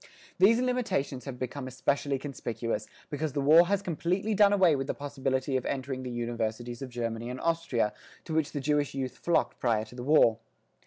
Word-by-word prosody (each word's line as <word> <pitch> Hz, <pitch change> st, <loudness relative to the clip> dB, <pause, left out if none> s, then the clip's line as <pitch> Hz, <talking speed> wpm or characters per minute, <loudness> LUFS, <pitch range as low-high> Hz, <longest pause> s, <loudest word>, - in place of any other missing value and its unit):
These 220 Hz, +5 st, +6 dB
limitations 225 Hz, -, -1 dB
have 135 Hz, -3 st, -6 dB
become 130 Hz, +2 st, -5 dB
especially 140 Hz, +2 st, 0 dB
conspicuous, 120 Hz, -5 st, -4 dB, 0.2 s
because 150 Hz, -1 st, -2 dB
the 145 Hz, -, -1 dB
war 160 Hz, +5 st, +6 dB
has 200 Hz, +1 st, 0 dB
completely 180 Hz, +5 st, -1 dB
done 205 Hz, 0 st, +5 dB
away 185 Hz, -6 st, +5 dB
with 135 Hz, -1 st, -3 dB
the -, -, -2 dB
possibility 135 Hz, -1 st, -2 dB
of 130 Hz, -, -4 dB
entering 130 Hz, -1 st, -3 dB
the 130 Hz, -, -5 dB
universities 120 Hz, 0 st, -3 dB
of 135 Hz, -, -5 dB
Germany 115 Hz, -1 st, -3 dB
and 125 Hz, +1 st, -5 dB
Austria, 165 Hz, -10 st, 0 dB, 0.3 s
to 160 Hz, -, -5 dB
which 160 Hz, -1 st, +1 dB
the 145 Hz, -, -3 dB
Jewish 145 Hz, 0 st, 0 dB
youth 130 Hz, -2 st, -3 dB
flocked 170 Hz, -, +1 dB
prior 110 Hz, -3 st, +1 dB
to 110 Hz, -, -15 dB
the 125 Hz, -, -7 dB
war. 125 Hz, -5 st, +4 dB
135 Hz, 190 wpm, -29 LUFS, 125-160 Hz, 0.3 s, These